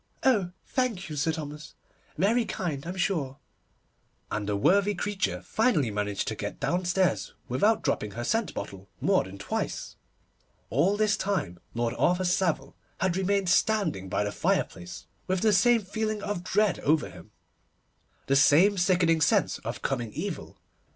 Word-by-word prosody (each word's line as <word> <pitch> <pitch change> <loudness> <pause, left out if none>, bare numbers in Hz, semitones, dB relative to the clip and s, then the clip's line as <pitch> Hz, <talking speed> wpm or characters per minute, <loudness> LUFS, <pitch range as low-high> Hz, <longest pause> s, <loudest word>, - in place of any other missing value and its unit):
Oh, 215 -9 +3 0.2
thank 235 -9 -1
you, - - -4
Sir 145 +3 +1
Thomas, 150 -1 -7 0.4
very 220 +8 +3
kind, 165 -8 -4
I'm 180 - -4
sure'; 155 -9 -1 0.9
and 105 -1 -2
the 105 - +1
worthy 200 - +3
creature 205 +2 -2
finally 170 - +1
managed 105 -1 -2
to - - -3
get - - -5
downstairs 175 - 0
without 205 - +2
dropping 105 - 0
her 120 - -4
scent 220 - -1
bottle 95 0 -7
more - - +3
than 95 +1 -10
twice. 100 - -4 0.7
All 175 - +2
this 215 -1 +3
time 185 - -2 0.2
Lord 120 0 0
Arthur 180 +1 +2
Savile 180 -2 0 0.2
had 185 -1 +1
remained 190 0 +1
standing 190 - +1
by 105 - 0
the 105 - -2
fireplace, 90 -2 -2 0.2
with 185 -1 0
the 215 -1 +4
same 230 +3 +4
feeling 215 +1 -3
of 205 -4 -3
dread 210 +1 +1
over 155 +2 +2
him, - - -13 1.0
the 135 - +2
same 175 +8 +5
sickening 175 -3 +3
sense 150 - +2
of - - -6
coming 120 -5 -2
evil. 175 +3 -5
175 Hz, 150 wpm, -27 LUFS, 135-200 Hz, 1.0 s, same